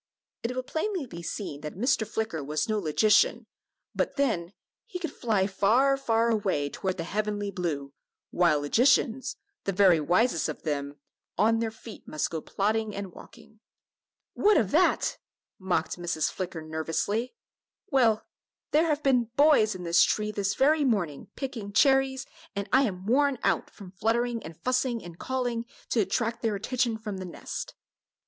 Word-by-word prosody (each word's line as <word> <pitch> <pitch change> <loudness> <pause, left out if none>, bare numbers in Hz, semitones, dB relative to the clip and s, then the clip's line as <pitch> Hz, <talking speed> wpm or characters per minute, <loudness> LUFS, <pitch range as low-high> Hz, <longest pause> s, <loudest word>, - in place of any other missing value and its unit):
It 240 +2 -3
will 255 - -2
plainly 340 +3 -2
be 170 -8 -9
seen 165 -4 -5
that 150 - -6
Mr. 220 +1 +1
Flicker 220 -8 -3
was 150 +2 -1
no 215 -1 0
logician, 215 +7 +3 0.5
but - - -1
then, 220 - 0 0.4
he 440 - -5
could 335 -5 -4
fly 215 -6 +1
far, 225 +8 +3
far 230 -3 +1
away 190 -10 0
toward 190 -1 -3
the 165 - -3
heavenly 205 +2 -2
blue, 155 -7 -3 0.4
while 170 -5 +3
logicians 245 - +2 0.3
the 195 - +1
very 185 -3 +5
wisest 175 - +2
of - - -6
them 145 -2 -3 0.4
"on 225 +2 +3
their 225 -1 0
feet 220 0 -12
must 155 - -2
go 160 -1 -3
plodding 215 +3 -1
and 200 -2 -5
walking." 225 +3 -15 0.7
"What 420 0 +4
of 205 -3 +1
that!" 355 +4 +2 0.4
mocked 180 -2 -1
Mrs. 170 -3 -1
Flicker, 175 -4 -5
nervously. 165 - -2 0.6
"Well, 235 -6 +3 0.5
there 315 +3 +4
have 300 -1 0
been 250 -3 +3
boys 280 -8 +5
in 180 - -7
this 170 -1 +4
tree 210 0 +2
this 200 -1 -1
very 300 +3 +3
morning, 190 - -1
picking 230 -7 -5
cherries, 270 +1 +3 0.3
and 200 +1 -3
I 265 +1 +6
am 185 -4 -4
worn 275 +4 +3
out - - +2
with 190 -2 -10
fluttering 235 +2 +1
and 160 -3 -10
fussing 255 -2 0
and 175 -1 -11
calling, 245 -3 -2 0.2
to 235 - +1
attract 220 +3 0
their 225 -3 0
attention 235 +2 -1
from 210 -3 -6
the 185 - -6
nest." 175 - -7
215 Hz, 160 wpm, -27 LUFS, 180-250 Hz, 0.7 s, I